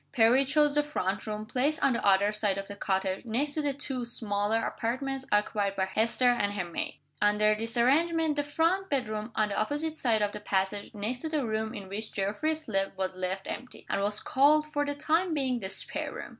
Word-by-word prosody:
Perry 250 Hz, +2 st, +5 dB
chose 295 Hz, +1 st, +3 dB
the 295 Hz, -, +5 dB
front 205 Hz, -10 st, -2 dB
room, 215 Hz, 0 st, -4 dB
placed 275 Hz, +7 st, 0 dB
on 265 Hz, -, +4 dB
the 235 Hz, -, -2 dB
other 200 Hz, +1 st, +4 dB
side 210 Hz, -2 st, 0 dB
of 195 Hz, 0 st, -5 dB
the 200 Hz, -, -7 dB
cottage, 190 Hz, -1 st, -1 dB
next 255 Hz, +6 st, -1 dB
to 310 Hz, -, -1 dB
the 290 Hz, -1 st, 0 dB
two 270 Hz, -2 st, -4 dB
smaller 220 Hz, -2 st, 0 dB
apartments 265 Hz, +3 st, -3 dB
occupied 210 Hz, -1 st, +1 dB
by 190 Hz, -1 st, +1 dB
Hester 225 Hz, +6 st, +2 dB
and 205 Hz, -4 st, 0 dB
her 195 Hz, -3 st, -2 dB
maid. 170 Hz, -, -4 dB, 0.2 s
Under 210 Hz, +1 st, +4 dB
this 225 Hz, +2 st, -4 dB
arrangement, 315 Hz, +5 st, +3 dB
the 290 Hz, -, +1 dB
front 330 Hz, +6 st, 0 dB
bedroom, 215 Hz, -5 st, -2 dB
on 215 Hz, -1 st, +2 dB
the 200 Hz, -, -3 dB
opposite 295 Hz, +7 st, -1 dB
side 225 Hz, -7 st, +2 dB
of 205 Hz, -, 0 dB
the 210 Hz, -, -7 dB
passage 200 Hz, +1 st, -2 dB
next 215 Hz, +5 st, -3 dB
to 320 Hz, -, -3 dB
the 300 Hz, -4 st, 0 dB
room 220 Hz, 0 st, -2 dB
in 195 Hz, -2 st, -7 dB
which 215 Hz, +3 st, -6 dB
Geoffrey 210 Hz, +11 st, 0 dB
slept 195 Hz, -11 st, -2 dB
was 190 Hz, -1 st, -1 dB
left 185 Hz, +1 st, -3 dB
empty, 250 Hz, 0 st, -7 dB
and -, -, 0 dB
was 205 Hz, +1 st, 0 dB
called, 300 Hz, +3 st, +4 dB
for 290 Hz, -1 st, +1 dB
the 285 Hz, -, -2 dB
time 325 Hz, +3 st, +1 dB
being, 260 Hz, -4 st, 0 dB
the 190 Hz, -, -5 dB
spare -, -, -1 dB
room. -, -, -7 dB
225 Hz, 215 wpm, -29 LUFS, 205-285 Hz, 0.2 s, Perry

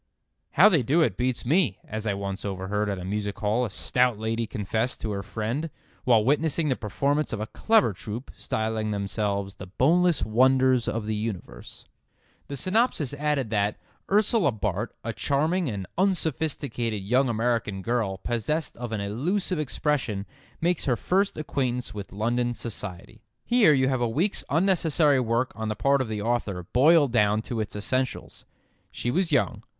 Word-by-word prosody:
"How -, -, +7 dB
they 170 Hz, -9 st, +4 dB
do 150 Hz, +8 st, +3 dB
it -, -, 0 dB
beats 125 Hz, 0 st, -1 dB
me," 145 Hz, -, +2 dB
as 110 Hz, +1 st, -4 dB
I 100 Hz, -, 0 dB
once 100 Hz, -1 st, -4 dB
overheard 100 Hz, +1 st, -2 dB
at 100 Hz, -, -2 dB
a 90 Hz, -, -6 dB
music 100 Hz, +1 st, -3 dB
hall 110 Hz, +4 st, +1 dB
a -, -, -4 dB
stout 125 Hz, +3 st, +1 dB
lady 110 Hz, +1 st, -2 dB
confess 110 Hz, +4 st, -2 dB
to 110 Hz, -, -4 dB
her 100 Hz, -1 st, -3 dB
friend 110 Hz, -, -3 dB, 0.4 s
while 115 Hz, -4 st, +4 dB
witnessing 150 Hz, +3 st, +1 dB
the 130 Hz, -, +2 dB
performance 140 Hz, +8 st, -1 dB
of 115 Hz, -, -3 dB
a 110 Hz, -, -2 dB
clever 125 Hz, -, +2 dB
troup, 110 Hz, +7 st, -7 dB
styling 110 Hz, 0 st, -2 dB
themselves 100 Hz, -1 st, -2 dB
"The 95 Hz, -, -8 dB
Boneless 165 Hz, -, +2 dB
Wonders 130 Hz, +2 st, +3 dB
of 115 Hz, -1 st, -2 dB
the 110 Hz, -, -1 dB
Universe." 105 Hz, -3 st, -6 dB, 0.6 s
The 140 Hz, -, -5 dB
synopsis 185 Hz, -, +1 dB
added 145 Hz, -5 st, -1 dB
that: 105 Hz, -1 st, +1 dB, 0.3 s
"Ursula 210 Hz, 0 st, +4 dB
Bart, 110 Hz, -, -3 dB
a -, -, -3 dB
charming 155 Hz, +4 st, 0 dB
and 100 Hz, -4 st, -4 dB
unsophisticated 145 Hz, -, -1 dB
young 125 Hz, +6 st, +2 dB
American 115 Hz, -4 st, -1 dB
girl 115 Hz, -4 st, -1 dB
possessed 120 Hz, +10 st, -2 dB
of 120 Hz, -1 st, -5 dB
an 110 Hz, -2 st, -2 dB
elusive 160 Hz, -, -1 dB
expression 130 Hz, -8 st, -1 dB, 0.3 s
makes 175 Hz, 0 st, 0 dB
her 125 Hz, -, +2 dB
first 195 Hz, -, 0 dB
acquaintance 130 Hz, -5 st, -2 dB
with 100 Hz, -2 st, -7 dB
London 120 Hz, +4 st, 0 dB
society." 105 Hz, -2 st, -7 dB, 0.2 s
Here 240 Hz, -8 st, +5 dB
you 130 Hz, -2 st, +3 dB
have 130 Hz, -2 st, 0 dB
a 120 Hz, -, +1 dB
week's 170 Hz, -, 0 dB
unnecessary 160 Hz, -4 st, +3 dB
work 120 Hz, +1 st, 0 dB
on 110 Hz, +1 st, -4 dB
the 110 Hz, -, -2 dB
part 140 Hz, +5 st, +2 dB
of 130 Hz, -, -2 dB
the 105 Hz, -2 st, -3 dB
author 110 Hz, -6 st, -1 dB
boiled 145 Hz, +1 st, +5 dB
down 105 Hz, -1 st, +2 dB
to 120 Hz, -1 st, -4 dB
its 105 Hz, -2 st, -4 dB
essentials. 130 Hz, +5 st, -3 dB, 0.4 s
She 120 Hz, -, -3 dB
was 175 Hz, +4 st, 0 dB
young. 125 Hz, -6 st, +1 dB
120 Hz, 165 wpm, -26 LUFS, 105-145 Hz, 0.6 s, How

